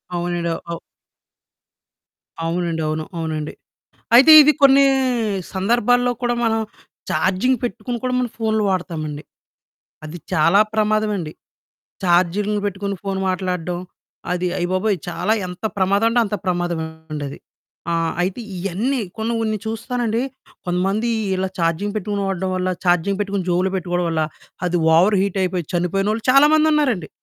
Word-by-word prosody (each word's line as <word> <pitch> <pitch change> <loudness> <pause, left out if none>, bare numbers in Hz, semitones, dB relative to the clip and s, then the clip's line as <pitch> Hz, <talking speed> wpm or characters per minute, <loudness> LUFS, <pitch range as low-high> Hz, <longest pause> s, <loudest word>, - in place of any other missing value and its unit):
అవునండి. 175 -1 -2 0.2
అవు 170 - -4
అవు 170 - -5 1.7
అవునండి. 170 -1 -1
అవును. 155 0 -2
అవునండి. 155 -2 -3 0.6
అయితే 270 +6 +8
ఇది 300 +1 +6
కొన్ని 275 0 +7 0.7
సందర్భాల్లో 240 +5 +2
కూడా 240 -1 +1
మనం 225 0 +1 0.5
చార్జింగ్ 195 +8 +1
పెట్టుకొని 240 0 -3
కూడా 255 - -1
మనం 250 -1 -1
ఫోన్లు 220 -1 +1
వాడతామండి. 160 -5 -3 0.8
అది 155 +3 -7
చాలా 170 +4 +4
ప్రమాదవండి, 210 -6 0 0.7
చార్జింగ్లు 185 +4 +2
పెట్టుకొని 200 0 -3
ఫోను 195 -1 -2
మాట్లాడడం 180 -2 -2 0.5
అది 180 0 0
అయ్యబాబోయ్! 185 +3 0
చాలా 180 +5 0
ఎంత 180 +2 -10
ప్రమాదం 200 +3 +2
అంటే 240 - +2
అంత 210 0 -2
ప్రమాదమండది. 160 -5 -3 0.5
ఆహ్, 165 -1 0
అయితే 185 +5 -2 0.2
ఇవన్నీ 200 +9 -1 0.2
కొన్ని 220 +2 -1
కొన్ని 215 -1 -1
చూస్తానండి, 230 +1 -2 0.4
కొంతమంది 195 +6 0 0.3
ఇలా 190 0 -1
ఛార్జింగ్ 170 +5 0
పెట్టుకొని 205 0 -2
వాడడం 190 -1 -2
వల్ల, 185 0 -1 0.2
ఛార్జింగ్ 180 +2 +2
పెట్టుకొని 200 -2 -2
జేబులో 180 +2 +1
పెట్టుకోవడం 175 -1 -1
వల్ల 160 -1 0 0.4
అది 175 0 0 0.2
ఓవర్ 195 +4 +4
హీట్ 200 -1 -2
అయిపోయి 180 -2 -2
చనిపోయినోళ్ళు 195 +5 0
చాలా 275 +3 +7
మందున్నారండి. 300 - +2
190 Hz, 125 wpm, -20 LUFS, 175-220 Hz, 1.7 s, అయితే